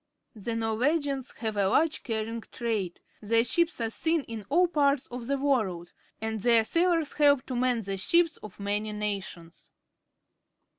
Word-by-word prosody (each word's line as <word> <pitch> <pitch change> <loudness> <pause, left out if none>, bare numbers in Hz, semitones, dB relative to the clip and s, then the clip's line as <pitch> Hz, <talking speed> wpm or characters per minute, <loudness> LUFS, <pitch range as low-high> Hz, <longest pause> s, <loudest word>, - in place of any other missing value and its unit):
The 225 +1 -4
Norwegians 265 +5 0
have 220 -2 -2
a 195 -1 +2
large 310 +7 +2
carrying 225 0 -3
trade. 215 -7 -2 0.2
Their 230 +2 +3
ships 335 +7 +1
are 225 -1 -1
seen 320 +4 0
in 220 -5 -8
all 355 +5 +4
parts 285 -4 +2
of 245 -1 -7
the 280 +1 +1
world, 215 -12 -1 0.3
and 220 0 -3
their 230 0 +5
sailors 335 +3 +1
help 285 -3 +4
to 255 - -4
man 245 -2 +1
the 195 0 -4
ships 335 - +2
of 210 -2 -12
many 205 +1 -2
nations. 195 -5 -5
230 Hz, 155 wpm, -28 LUFS, 210-285 Hz, 0.3 s, their